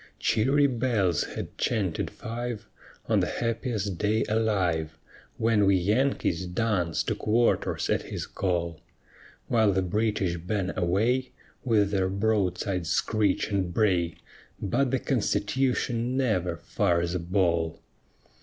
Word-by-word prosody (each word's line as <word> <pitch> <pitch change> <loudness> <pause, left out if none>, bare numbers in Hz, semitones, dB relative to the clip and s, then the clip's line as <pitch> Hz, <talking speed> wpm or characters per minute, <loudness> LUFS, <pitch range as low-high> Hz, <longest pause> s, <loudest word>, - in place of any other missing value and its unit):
Cheery 135 +6 +3
bells 115 - +1
had - - -6
chanted 100 -8 0
five 115 -2 -5 0.4
On - - +2
the - - +1
happiest 115 -5 -2
day 105 +1 +2
alive 90 -8 0 0.4
When 110 -3 +3
we 100 - +5
Yankees 95 -2 +1
dance 90 -3 0
to - - -1
quarters 115 +2 +1
at - - +1
his - - -5
call; 85 -4 -2 0.7
While 110 -4 +3
the 95 0 +1
British 100 -2 0
bang 95 +2 -2
away 110 +9 +1 0.3
With 105 -5 +2
their 95 -2 +1
broadsides' 95 -3 0
screech 105 -1 +1
and 95 -3 0
bray; 90 -4 +1 0.4
But 125 +7 +1
the 130 - +1
Constitution 125 +1 0
never 90 -10 0
fires 85 +2 0
a 90 - -1
ball. 85 -2 0
100 Hz, 120 wpm, -27 LUFS, 90-115 Hz, 0.7 s, we